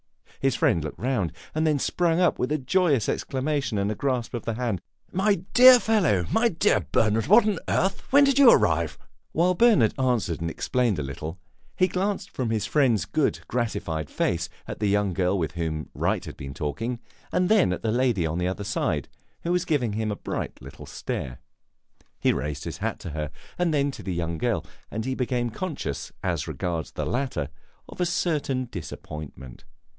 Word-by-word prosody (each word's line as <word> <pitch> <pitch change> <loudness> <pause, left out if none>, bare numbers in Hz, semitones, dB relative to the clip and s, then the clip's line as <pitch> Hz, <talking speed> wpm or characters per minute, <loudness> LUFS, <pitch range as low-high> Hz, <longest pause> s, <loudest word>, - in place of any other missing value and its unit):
His 135 -3 +1
friend 80 - +2
looked 75 - -6
round, 115 -10 -1 0.2
and 155 +1 +1
then 150 -2 +3
sprang 170 +4 +1
up 180 - +3
with 125 - -1
a 155 - +2
joyous 140 - +2
exclamation 135 -3 -1
and 100 +2 0
grasp 125 -3 -1
of 120 - -3
the 115 - -2
hand. 115 -6 -2 0.3
"My 195 -1 +1
dear 255 0 +9
fellow 180 - +2
my 235 +1 +3
dear 195 +2 +2
Bernard! 110 +2 +2
What 215 +4 +6
on 200 -6 0
earth 190 +1 +1
when 285 +2 +6
did 275 -1 +3
you 275 -4 +9
arrive?" 85 - +3 0.4
While 175 +3 +3
Bernard 210 - +4
answered 120 -11 0
and 85 - -1
explained 120 +3 0
a 75 - -2
little, 75 +5 -6 0.4
he 185 - +3
glanced 195 +2 -2
from 125 -3 -2
his 110 -2 0
friend's 125 - +2
good, - - 0
gratified 85 - -2
face 85 0 -1 0.2
at - - -6
the 105 - +1
young 100 -1 +2
girl 90 +1 +1
with 80 -4 -1
whom 80 -2 -3
Wright - - 0
had - - -8
been 70 0 -7
talking, 110 - -3 0.3
and 180 0 +2
then 210 - +4
at 90 - -3
the 110 - +1
lady 120 -7 +2
on 80 +2 -1
the 90 - 0
other 95 +2 -3
side, 90 - -1 0.4
who 170 - -1
was 180 0 +1
giving 130 - 0
him 110 0 -1
a - - -2
bright - - -5
little - - -11
stare. - - -4 0.8
He - - +3
raised 75 -1 -3
his - - -6
hat - - -2
to 85 - -6
her 75 -1 -3 0.3
and 175 -2 +2 0.2
to - - -8
the 95 -3 -3
young 85 -1 -2
girl, - - 0 0.2
and 110 +1 -4
he 130 - -1
became 125 -2 -1
conscious, 150 - -4
as - - -1
regards 85 -3 -3
the - - -3
latter, 125 - -2 0.4
of - - -8
a 175 - +2
certain 145 -7 0
disappointment. 75 - -8
120 Hz, 190 wpm, -26 LUFS, -, 0.8 s, dear